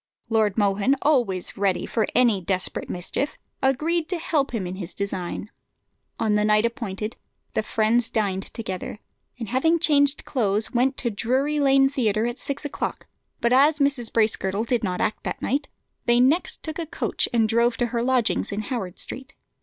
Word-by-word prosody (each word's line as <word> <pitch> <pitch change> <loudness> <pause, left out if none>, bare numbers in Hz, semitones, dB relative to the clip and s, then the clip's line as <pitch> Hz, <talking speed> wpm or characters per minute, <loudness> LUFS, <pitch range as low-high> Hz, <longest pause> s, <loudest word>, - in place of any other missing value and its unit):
Lord 220 -3 +2
Mohun, 205 +5 +2
always 240 -12 +1
ready 195 -2 0
for 220 -2 0
any 235 -5 +4
desperate 185 +1 -2
mischief, 185 +10 -3 0.2
agreed 310 +5 +1
to 365 - -1
help 300 -4 0
him 225 -6 -3
in 180 +1 -5
his 180 -2 -6
design. 200 +1 -4 0.7
On 220 -2 +1
the 210 0 +2
night 210 +1 +4
appointed 225 -3 -4 0.4
the - - +1
friends 225 +2 +1
dined 195 -3 -1
together, 190 -3 -5 0.4
and 230 -4 -6
having 320 +7 +3
changed 285 -2 +2
clothes, 215 -4 +1
went 260 +2 +2
to 235 - 0
Drury 260 +8 0
Lane 270 -1 +5
Theatre 225 -5 0
at 240 +1 -3
six 280 +1 -3
o'clock; 290 - -4 0.4
but 235 +1 +3
as 290 +4 +5
Mrs. 280 -5 0
Bracegirdle 215 -2 +1
did 235 -1 0
not 180 -3 -1
act 215 - -1
that - - -4
night, 280 +4 -1 0.4
they 240 0 +4
next 280 +8 +3
took 315 +1 -4
a 330 - -3
coach - - -1
and 230 -2 +3
drove 235 +1 +2
to 245 - +1
her 235 - +1
lodgings 245 -3 +1
in 205 +1 -2
Howard 205 -6 -4
Street. 265 +1 -5
235 Hz, 175 wpm, -24 LUFS, 210-270 Hz, 0.7 s, Lane